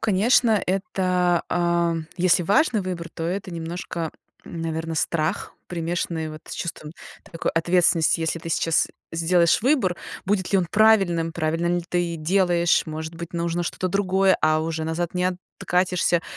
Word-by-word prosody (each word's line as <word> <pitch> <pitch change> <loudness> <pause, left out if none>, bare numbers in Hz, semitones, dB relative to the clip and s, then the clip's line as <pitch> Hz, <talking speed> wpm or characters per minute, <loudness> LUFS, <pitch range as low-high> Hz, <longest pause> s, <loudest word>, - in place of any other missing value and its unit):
конечно, 220 +1 +3
это, 185 -3 +1
а, 170 -1 +1 0.2
если 180 0 +3
важный 210 - +2
выбор, 180 -2 -5
то 165 - -5
это 185 +3 -3
немножко, 170 -1 -5 0.3
наверно, 165 -1 -4
страх, 160 +3 -1
примешанный 165 -2 -3
вот 155 - -9
с - - -5
чувством 155 -3 -6 0.4
такой 165 - -2
ответственности. 170 -1 +2
Если 160 +1 -1
ты 165 - -8
сейчас 165 0 +1 0.2
сделаешь 170 +1 +3
выбор, 245 -10 +2 0.3
будет 190 -2 0
ли 195 - +5
он 180 - 0
правильным, 195 -7 +3
правильно 165 +1 -1
ли 175 0 0
ты 175 -1 -1
делаешь, 175 +1 +2
может 160 +1 -6
быть, 170 +1 -8
нужно 170 0 -1
что-то 185 +2 -3
другое, 190 0 +2
а 155 0 +3
уже 160 0 -3
назад 165 +2 -3
не 180 0 0 0.3
откатишься. 180 -1 +1
175 Hz, 145 wpm, -23 LUFS, 165-185 Hz, 0.4 s, ли